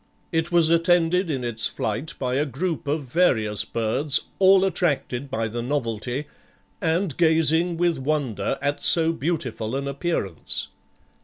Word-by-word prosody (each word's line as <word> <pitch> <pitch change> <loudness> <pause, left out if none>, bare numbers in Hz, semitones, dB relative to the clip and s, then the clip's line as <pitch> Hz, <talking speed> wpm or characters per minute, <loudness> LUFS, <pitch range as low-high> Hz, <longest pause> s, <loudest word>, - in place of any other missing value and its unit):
It 165 +1 -1
was 170 -2 +4
attended 175 +1 +3
in 135 -4 -2
its 115 -2 0
flight 125 +10 -4
by 125 -2 -2
a 140 +3 +2
group 155 +4 -3
of 145 +1 -1
various 120 - +1
birds, 125 +6 0 0.2
all 190 0 +6
attracted 145 -7 -1
by 115 -4 -2
the 120 +2 -4
novelty, 125 0 -3 0.6
and 165 -1 0
gazing 165 +1 +3
with 170 -3 +1
wonder 135 -3 -1
at 145 0 0
so 165 -1 +4
beautiful 135 -8 -3
an 140 0 -3
appearance." 140 - -2
150 Hz, 140 wpm, -24 LUFS, 125-165 Hz, 0.6 s, all